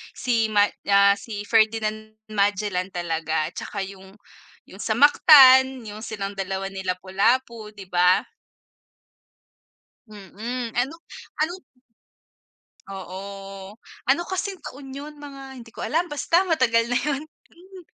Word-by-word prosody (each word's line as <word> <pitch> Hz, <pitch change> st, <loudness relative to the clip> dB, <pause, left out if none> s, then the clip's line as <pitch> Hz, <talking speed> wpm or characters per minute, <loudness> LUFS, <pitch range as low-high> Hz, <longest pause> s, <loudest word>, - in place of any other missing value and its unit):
si 230 Hz, -3 st, 0 dB
ma, 205 Hz, -1 st, +4 dB, 0.2 s
ah, 200 Hz, 0 st, +6 dB
si 205 Hz, -2 st, -7 dB
Ferdinand 215 Hz, -1 st, 0 dB, 0.2 s
Magellan 200 Hz, -2 st, 0 dB
talaga 160 Hz, -3 st, -2 dB
tsaka 200 Hz, -2 st, -5 dB
yung 190 Hz, 0 st, -13 dB, 0.5 s
yung 195 Hz, -, -11 dB
sa 220 Hz, 0 st, -1 dB
Mactan, 265 Hz, -4 st, +7 dB
yung 210 Hz, +2 st, -8 dB
silang 200 Hz, -2 st, -5 dB
2 195 Hz, 0 st, -3 dB
ni 190 Hz, 0 st, -6 dB
Lapu-Lapu, 210 Hz, +5 st, -1 dB
'di 195 Hz, -2 st, -10 dB
ba? 180 Hz, +1 st, +4 dB, 1.8 s
Mm, 220 Hz, +4 st, -6 dB
ano 265 Hz, +6 st, 0 dB, 0.5 s
ano 345 Hz, +3 st, -2 dB, 1.3 s
Oo, 195 Hz, +1 st, -9 dB, 0.3 s
ano 275 Hz, +6 st, +3 dB
kasing 380 Hz, -1 st, -3 dB
taon 270 Hz, 0 st, -9 dB
yun, 295 Hz, +1 st, -9 dB
mga 270 Hz, -2 st, -10 dB
hindi 230 Hz, -1 st, -13 dB
ko -, -, -6 dB
alam, 340 Hz, +3 st, 0 dB
basta 340 Hz, +5 st, +1 dB
matagal 235 Hz, -8 st, +2 dB
na 245 Hz, -, -1 dB
yun, 290 Hz, +2 st, -1 dB
hmm. 365 Hz, +3 st, -18 dB
215 Hz, 120 wpm, -23 LUFS, 195-265 Hz, 1.8 s, Mactan